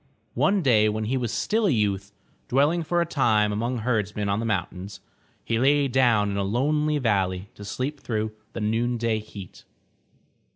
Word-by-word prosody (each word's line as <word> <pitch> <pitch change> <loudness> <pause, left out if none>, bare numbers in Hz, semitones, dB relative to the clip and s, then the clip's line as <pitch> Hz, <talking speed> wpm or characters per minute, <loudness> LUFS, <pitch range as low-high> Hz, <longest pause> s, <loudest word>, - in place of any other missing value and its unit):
One 195 -2 +2
day 110 -5 +4
when 110 +1 -2
he 115 +5 -1
was 120 -4 -1
still 215 - +1
a - - +3
youth, 100 - 0 0.4
dwelling 145 +7 +2
for 175 +2 0
a - - +1
time 115 -10 +2
among 120 +4 -1
herdsmen 105 -3 -1
on 100 +1 0
the 115 - -2
mountains, 95 -1 -3 0.5
he 115 -1 0
lay 140 +2 +3
down 120 -6 +3
in 100 - -3
a 100 - 0
lonely 150 +8 +1
valley 100 -6 0
to 105 - -11
sleep 130 +8 -4
through 110 -3 -2 0.2
the - - -5
noonday 115 +1 0
heat. 105 -3 -11
115 Hz, 170 wpm, -25 LUFS, 105-135 Hz, 0.5 s, day